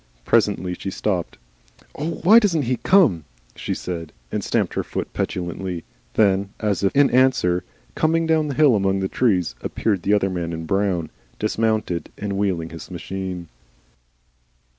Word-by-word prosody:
Presently 90 +1 +2
she 95 - -5
stopped. 95 -2 -2 0.6
"Oh! 155 +4 -4
Why 215 +7 +8
DOESN'T 175 -9 +1
he 125 0 0
come?" 165 - +4 0.3
she - - -3
said, 85 -3 -5 0.2
and - - -2
stamped - - 0
her - - -1
foot - - -5
petulantly. 90 0 -3 0.3
Then, 100 -2 +3
as 105 -2 -1
if 100 - +1
in 140 0 +5
answer, 125 -9 +3 0.3
coming 165 - +1
down 160 -1 +2
the 140 - -3
hill 145 -4 +5
among 95 -1 +1
the 95 - 0
trees, 95 - +1
appeared 100 -5 -1
the 100 +4 +3
other 95 -2 +1
man 85 -2 -3
in 80 0 -5
brown, 95 -3 0 0.3
dismounted 110 -4 -1
and 100 -1 -3
wheeling 95 -5 -1
his 80 -2 -9
machine. 90 -1 -5
95 Hz, 155 wpm, -22 LUFS, 90-125 Hz, 0.6 s, Why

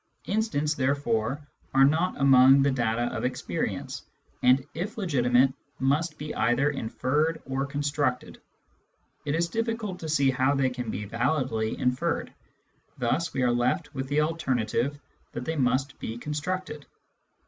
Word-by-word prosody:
Instants, 195 -9 0
there 140 -1 +1
fore, 135 +2 -2 0.3
are 135 0 +7
not 160 +4 +1
among 135 0 +7
the 140 - +3
data 120 -2 0
of - - -3
experience, 125 0 -3 0.4
and, 130 +2 +4
if 195 +8 -4
legitimate, 130 - +3 0.2
must 150 +4 0
be 150 0 -5
either 130 +5 +2
inferred 145 +5 -1
or 135 +1 -2
constructed. 145 -2 -2 0.8
It 145 +1 0
is 170 +1 +1
difficult 225 -2 -3
to 160 - -6
see 140 -3 +3
how 130 +2 +2
they 135 -2 +1
can 125 -2 -5
be 105 0 -4
validly 120 -1 -1
inferred; 125 0 -1 0.6
thus 150 +7 0
we 130 - -1
are 125 - +3
left 120 +4 0
with 135 -1 -4
the 145 +2 +2
alternative 140 -3 -1 0.3
that 120 - -5
they 160 - -2
must 135 0 0
be 110 - -5
constructed. 150 +2 -4
140 Hz, 145 wpm, -27 LUFS, 125-150 Hz, 0.8 s, are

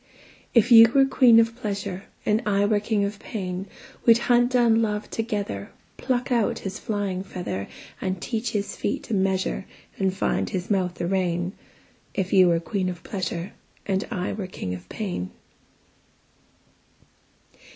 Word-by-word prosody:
If 235 +1 +5
you 230 -1 +10
were 270 -1 +7
queen 250 -3 +6
of 230 0 +2
pleasure, 200 -4 -4 0.2
And 215 +1 +2
I 200 -1 +2
were 205 0 +2
king 210 -1 0
of 200 0 -5
pain, 185 -3 -5 0.4
We'd 230 -1 +7
hunt 245 +1 +3
down 235 -2 +4
love 210 -1 -2
together, 205 - -3 0.3
Pluck 255 0 -1
out 235 -4 +2
his 195 +1 -5
flying 200 -3 -2
feather, 175 - -5 0.3
And 185 -1 -2
teach 225 +3 -2
his 205 -2 -3
feet 205 - -3
a - - 0
measure, 190 -1 0 0.3
And 190 -1 +2
find 190 - -1
his 185 +2 -3
mouth 180 -3 0
a - - 0
rein; 175 -1 0 0.6
If 190 -2 -1
you 185 -2 +7
were 170 -1 +3
queen 185 +1 -2
of 180 0 -7
pleasure. 185 -1 -4 0.3
And 195 -1 0
I 185 -6 -2
were 200 -3 -4
king 95 - -5
of 90 -1 -9
pain. 180 - -4
200 Hz, 155 wpm, -25 LUFS, 185-225 Hz, 0.6 s, you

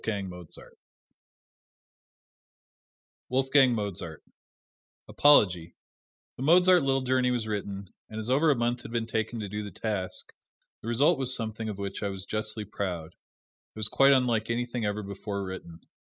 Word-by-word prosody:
Dudley 105 -3 -2
Buck 90 -2 -10 2.8
WOLFGANG 130 -1 +4
MOZART 95 -7 -5 0.8
Apology: 90 - +4 0.6
The - - -8
Mozart 180 +4 +6
"Little 135 -1 +1
Journey" 130 0 +2
was 120 -3 -1
written, 100 -2 -4 0.2
and 110 - -6
as 110 - -5
over 140 +6 +3
a 145 - +4
month 120 0 -1
had - - -9
been 115 -1 -1
taken 110 +1 -2
to 105 - -4
do 105 +2 -4
the 105 - -6
task, 100 -3 -4 0.5
the - - -9
result 140 +7 +3
was 130 -1 +1
something 110 -1 -4
of 105 - -5
which 100 -1 -5
I 100 - -1
was 95 -1 -7
justly 110 0 -3
proud. 90 -6 -4
It - - -55
was 110 -1 +2
quite 135 0 +5
unlike 120 -5 +2
anything 120 0 -2
ever 105 +1 -2
before 100 0 -5
written. 90 -3 -8
110 Hz, 150 wpm, -28 LUFS, 100-125 Hz, 2.8 s, Mozart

